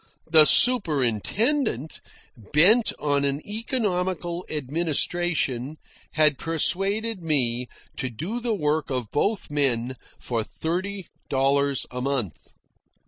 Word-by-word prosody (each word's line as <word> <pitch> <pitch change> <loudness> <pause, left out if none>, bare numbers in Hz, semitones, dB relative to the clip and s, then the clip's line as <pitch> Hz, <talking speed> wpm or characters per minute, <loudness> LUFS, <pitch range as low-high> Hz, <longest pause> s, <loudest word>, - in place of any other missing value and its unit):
The 155 -2 +8
superintendent, 160 - +2 0.3
bent 170 - +3
on 145 -1 0
an 140 0 0
economical 185 - -2
administration, 155 -2 -1 0.4
had 150 -3 +2
persuaded 195 +6 0
me 125 -6 +1 0.3
to 130 - -3
do 170 - -5
the 235 -2 -2
work 150 -3 -1
of 125 -5 -4
both 200 +3 -1
men 130 -4 0 0.2
for 115 -3 -3
thirty 185 - -4 0.2
dollars 140 0 +1
a 125 0 -5
month. 125 - -3
155 Hz, 100 wpm, -24 LUFS, 135-190 Hz, 0.4 s, The